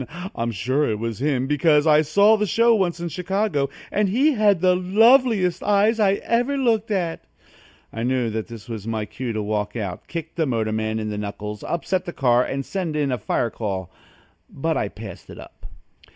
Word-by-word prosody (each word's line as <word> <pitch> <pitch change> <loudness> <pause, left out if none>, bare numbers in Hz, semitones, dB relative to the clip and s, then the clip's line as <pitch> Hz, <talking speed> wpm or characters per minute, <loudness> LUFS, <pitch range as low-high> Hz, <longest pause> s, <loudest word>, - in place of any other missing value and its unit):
I'm 115 0 -2
sure 130 +8 0
it 110 - -1
was 115 0 -4
him, 135 -3 +1
because 150 +1 +3
I 155 -1 +5
saw 200 +8 +4
the 210 -1 -1
show 230 +5 +4
once 185 -5 0
in 170 - -3
Chicago 180 -4 -1 0.2
and 205 -1 +1
he 270 +10 +3
has 210 -6 +3
the 180 +1 +3
loveliest 215 0 +3
eyes 210 +2 +2
I 200 -2 +4
ever 240 +7 0
looked 230 -5 +1
at!" 180 -5 -2 0.7
I 115 - -5
knew 125 -1 0
that 110 0 -4
that 115 -3 -10
was 110 -3 -6
my 110 -2 -2
cue 125 +3 -5
to 110 -1 -3
walk 105 0 -2
out, 100 -6 -5
kick 165 -1 -6
the 160 -3 -1
motorman 110 -2 -1
in 110 -1 -3
the 105 - -4
knuckles, 105 0 -6
upset 180 +2 -2
the 175 - -6
car 125 -2 +3
and 135 +1 -4
send 180 -6 -3
in 145 -3 0
a 125 - -1
fire 115 +2 -1
call, 95 -5 -4 0.6
but 160 +3 -2
I - - 0
passed 105 -4 -10
it - - -10
up. - - -13
150 Hz, 195 wpm, -22 LUFS, -, 0.7 s, I